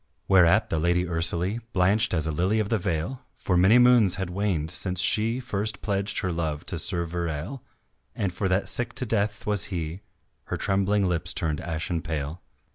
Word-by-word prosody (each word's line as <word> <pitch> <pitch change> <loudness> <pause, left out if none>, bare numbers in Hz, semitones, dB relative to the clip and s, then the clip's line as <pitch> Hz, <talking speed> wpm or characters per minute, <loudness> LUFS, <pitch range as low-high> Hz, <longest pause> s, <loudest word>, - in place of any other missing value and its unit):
Whereat 95 +2 +4
the 80 - 0
Lady 85 +2 +1
Ursalie 85 +5 -1
Blanched 95 +3 +2
as 80 -2 0
a 80 - -1
lily 95 +8 +1
of 105 -2 -1
the 115 - +1
vale, 90 +8 -3
For 90 - -1
many 95 +6 +5
moons 120 -7 +5
had 95 -1 -4
waned 90 -5 -1
since 90 0 -1
she 110 +6 +3
First 105 -5 -3
pledged 100 -1 -1
her 90 - -1
love 80 -3 -3
to 85 - -2
Sir 85 -1 0
Verale, 85 - -4 0.5
And 95 -3 -2
for 95 +2 -1
that 95 +1 +1
sick 120 - +1
to 125 - 0
death 105 -2 -1
was 105 -1 +1
he 85 -1 -5 0.4
Her - - -4
trembling 100 0 +1
lips 85 -1 +1
turned 75 -3 -1
ashen 85 0 -3
pale. 80 0 -4
90 Hz, 185 wpm, -25 LUFS, 85-105 Hz, 0.5 s, many